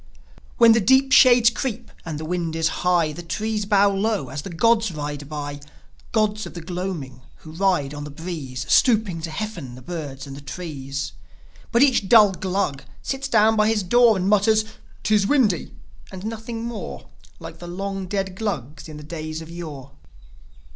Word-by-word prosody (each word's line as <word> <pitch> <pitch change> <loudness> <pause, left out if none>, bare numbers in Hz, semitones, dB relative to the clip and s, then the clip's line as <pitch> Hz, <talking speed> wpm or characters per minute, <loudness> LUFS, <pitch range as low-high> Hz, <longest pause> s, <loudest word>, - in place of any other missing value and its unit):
When 235 -2 +7
the 225 0 +4
deep 265 +5 +4
shades 245 -3 +7
creep 240 -1 -4
and 155 -3 -5
the 155 - -5
wind 170 -1 -2
is 165 0 +1
high 175 -3 +2
The 150 - -7
trees 210 +5 -3
bow 200 -1 +4
low 200 - -1
as 145 - -5
the 195 - -8
gods 225 +4 +2
ride 145 -2 -5
by: 145 -1 -5 0.5
Gods 215 -1 0
of - - -12
the 170 - -6
gloaming, 165 -7 -5 0.2
who 155 - -9
ride 170 -5 0
on 145 0 -6
the 150 - -7
breeze, 145 -5 -6
Stooping 215 -9 +3
to 165 - -4
heaften 165 - -5
the 130 - -12
birds 145 -3 -6
and 135 -1 -9
the 140 - -10
trees. 140 -3 -6 0.6
But 235 +2 +5
each 250 -8 +2
dull 215 -4 +7
Glug 185 -7 -2 0.2
sits 270 0 -3
down 220 -3 +4
by 215 0 +3
his 220 -2 +1
door, 235 +3 +5
And 185 0 -1
mutters, 215 +1 +3 0.2
" - - -27
'Tis 210 -2 +2
windy!" 220 - +2 0.4
and 190 +1 -8
nothing 225 +1 -5
more, 235 -2 -6 0.3
Like - - -10
the 175 - -8
long 195 +1 -4
dead 190 -1 -2
Glugs 160 - -4
in 155 - -9
the 150 - -10
days 155 0 -6
of 165 0 -10
yore. 150 -6 -8
185 Hz, 180 wpm, -23 LUFS, 155-215 Hz, 0.6 s, When